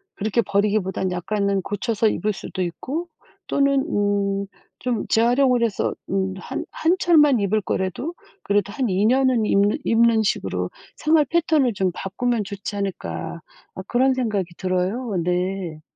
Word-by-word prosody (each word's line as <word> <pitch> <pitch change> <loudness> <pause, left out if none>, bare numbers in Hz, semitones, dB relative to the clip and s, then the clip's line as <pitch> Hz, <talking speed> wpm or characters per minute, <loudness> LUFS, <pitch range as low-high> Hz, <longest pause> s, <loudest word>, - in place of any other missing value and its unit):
그렇게 215 +3 +1
버리기보다는 200 -3 0
약간은 200 +2 0
고쳐서 220 +2 0
입을 210 0 -1
수도 185 - -6
있고 270 - -3 0.4
또는 275 -1 +2
음 200 -5 0 0.4
좀 245 -4 -1
재활용을 245 +2 +3
해서 225 -4 0 0.2
음 190 0 0
한 - - -5
한 335 +3 +2
철만 295 -7 +5
입을 200 +2 +2
거라도 190 - -2 0.3
그래도 200 0 +1
한 255 +3 -1
2 190 +2 +2
년은 255 -1 +3
입는 205 0 +3
입는 230 -1 +4
식으로 210 - -1 0.3
'생활 310 -1 +3
패턴을 315 -7 +2
좀 190 -2 0
바꾸면 215 +4 -2
좋지 200 +1 -6
않을까?' 200 -1 -4 0.3
아 - - -5
그런 260 +2 +3
생각이 210 -9 -2
들어요. 190 +4 -1
네. 180 -2 -2
210 Hz, 295 characters per minute, -22 LUFS, 195-250 Hz, 0.4 s, 철만